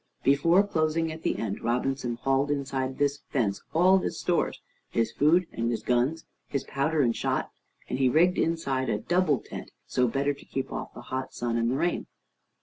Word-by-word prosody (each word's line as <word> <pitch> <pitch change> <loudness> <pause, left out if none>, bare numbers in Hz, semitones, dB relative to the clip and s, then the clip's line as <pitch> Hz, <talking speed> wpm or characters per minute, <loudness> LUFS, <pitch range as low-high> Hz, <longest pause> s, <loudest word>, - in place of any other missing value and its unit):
Before 165 +8 +5
closing 160 -3 0
up 160 0 -8
the - - 0
end, 100 -3 -3
Robinson 125 +1 -1
hauled 135 +3 +1
inside 135 -2 -2
this 145 0 +1
fence 105 -7 0
all 185 +4 +5
his - - -3
stores, 175 -1 0 0.3
his 115 -1 0
food 165 +8 +3
and 115 0 -1
his 115 - -2
guns, 125 +7 +1 0.2
his 140 - -2
powder 150 +3 0
and 115 -2 +2
shot, - - -1 0.4
and 130 - -3
he 130 -1 +4
rigged 175 +7 +4
inside 140 -6 0
a - - +1
double 175 -5 +2
tent, - - -8 0.2
so 125 0 +1
better 140 +4 0
to 140 - -14
keep 135 - -4
off - - -5
the - - -8
hot 130 0 -3
sun 120 -1 -1
and 115 0 +1
the 130 - 0
rain. 175 +4 0
140 Hz, 190 wpm, -27 LUFS, 125-160 Hz, 0.4 s, Before